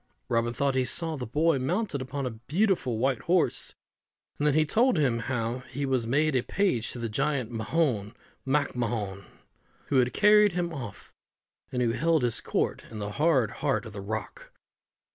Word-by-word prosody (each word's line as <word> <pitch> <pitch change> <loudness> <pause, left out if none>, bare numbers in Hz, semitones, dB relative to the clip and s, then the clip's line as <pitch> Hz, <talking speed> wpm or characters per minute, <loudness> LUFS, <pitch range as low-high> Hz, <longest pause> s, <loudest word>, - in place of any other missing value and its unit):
Robin 120 -1 +1
thought 140 +3 0
he 130 0 +2
saw 160 +5 -2
the 125 -5 -5
boy 150 +4 +2
mounted 165 - -1
upon 135 +1 -4
a 125 - -2 0.2
beautiful 170 - +1
white 130 +1 +1
horse, 180 -1 +1 0.6
and 150 - +2
that 145 - +3
he 155 0 +4
told 240 - +3
him 130 -6 +2
how 120 0 -2
he 140 +2 -3
was 130 -4 0
made 145 +4 +2
a 125 - +3
page 130 - 0
to - - -6
the 115 -1 -3
giant 130 +1 -1
Mahon 115 -2 -1 0.3
MacMahon, 120 -8 -1 0.6
who 140 - +2
had 125 -1 +3
carried 210 -1 +5
him 175 -1 -2
off, 120 -10 -8 0.6
and 125 -1 0
who 115 - +2
held 155 +4 +2
his 120 -2 0
court - - -1
in 110 - -8
the 105 0 -4
hard 135 -3 +2
heart 140 -4 0
of 110 - -9
the 100 - -6
rock. 105 +1 -6
130 Hz, 180 wpm, -28 LUFS, 115-155 Hz, 0.6 s, carried